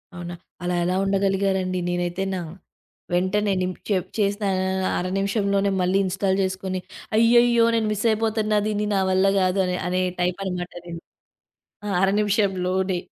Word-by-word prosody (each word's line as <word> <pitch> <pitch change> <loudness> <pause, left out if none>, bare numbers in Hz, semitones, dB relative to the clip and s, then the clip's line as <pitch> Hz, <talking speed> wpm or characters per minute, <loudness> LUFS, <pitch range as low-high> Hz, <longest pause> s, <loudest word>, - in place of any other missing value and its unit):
అవునా. 175 0 -6 0.3
అలా 180 0 0
ఎలా 180 +1 0
ఉండగలిగారండి? 195 -1 0
నేనైతేనా, 175 +2 -2 0.7
వెంటనే 190 +3 +1
నిం 185 0 0 0.2
చెప్ 185 -4 0
చేసిన 205 +1 0 0.4
అ - - 0
అర 180 - -2
నిమిషంలోనే 200 0 +1
మళ్ళీ 180 +2 +2
ఇన్‌స్టాల్ 190 +1 0
చేసుకొని 190 0 -3 0.4
అయ్యయ్యో! 235 +1 +5
నేను 225 -1 +1
మిస్ 210 +2 -3
అయిపోతన్న 215 -1 +1
దీన్ని 210 0 -1
నా - - +2
వల్ల 190 +1 +3 0.2
కాదు 185 +1 +2
అని 180 0 -1
అనే 185 +1 0 0.2
టైప్ 180 +1 0
అనమాట 180 -1 -4
నేను. 170 -1 -6 0.9
ఆ! - - -2
అర 195 - +4
నిమిషం‌లోనే. 190 -3 0
190 Hz, 140 wpm, -23 LUFS, 180-205 Hz, 0.9 s, అయ్యయ్యో